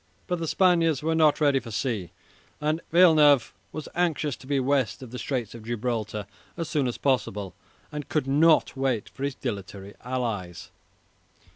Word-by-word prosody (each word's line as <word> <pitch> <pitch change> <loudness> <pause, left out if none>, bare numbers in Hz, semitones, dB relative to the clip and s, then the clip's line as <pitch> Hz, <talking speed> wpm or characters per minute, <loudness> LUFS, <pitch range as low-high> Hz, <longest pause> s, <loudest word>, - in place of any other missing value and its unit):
But 180 -1 -2
the 165 - -3
Spaniards 165 -5 +3
were 160 +1 +1
not 155 -2 +4
ready 145 -3 +3
for 120 - -10
sea, 110 -4 -2 0.5
and 155 +2 0
Villeneuve 155 -7 +6 0.2
was 155 - -6
anxious 160 -5 0
to 130 - -15
be 140 -1 +1
west 130 -5 0
of 120 - -10
the 125 - -6
Straits 125 -6 -3
of 115 - -9
Gibraltar 110 -2 -3 0.3
as 165 -2 -3
soon 150 -4 0
as 120 - -3
possible, 105 - -1 0.4
and 150 -1 -6
could 155 -4 0
not 155 +4 +4
wait 130 -5 -1
for - - -14
his 140 -1 -1
dilatory 100 -4 -6
allies. 115 -9 -4
135 Hz, 165 wpm, -26 LUFS, 115-155 Hz, 0.5 s, Villeneuve